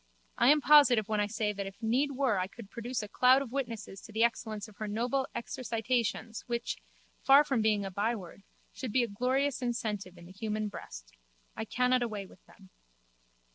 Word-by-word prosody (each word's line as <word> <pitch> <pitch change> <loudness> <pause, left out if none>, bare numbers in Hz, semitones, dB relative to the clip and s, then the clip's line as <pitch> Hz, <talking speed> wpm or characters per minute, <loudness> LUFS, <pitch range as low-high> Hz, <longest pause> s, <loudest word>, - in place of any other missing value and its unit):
I - - +6
am 300 +1 +6
positive 275 -8 +6
when 215 -1 0
I 205 - +1
say 210 0 -1
that 200 -1 -4
if 195 0 -10
need 260 +6 +1
were 255 -7 +1
I 185 - -1
could 205 0 -13
produce 240 0 -4
a - - -6
cloud 255 +5 +4
of 245 - -10
witnesses 230 -7 -4
to 220 - -12
the 220 +2 +2
excellence 220 -3 -1
of 210 -2 -17
her 215 - -4
noble 245 +6 -1
exercitations 230 -1 -2
which, 235 -1 -2
so - - -20 0.4
far 275 +2 +7
from 265 -6 0
being 210 -2 +2
a 195 - -5
byword, 200 -2 -3 0.3
should 255 -4 -5
be 250 +3 +3
a - - -1
glorious 255 +6 0
incentive 210 -6 -3
in 175 - -13
the 175 - -12
human 215 +2 -3
breast. - - -10 0.4
I 220 - -4
cannot 250 +2 +2
away 215 -4 -3
with 190 - -18
them. 190 -3 -19
225 Hz, 200 wpm, -31 LUFS, 205-250 Hz, 0.4 s, far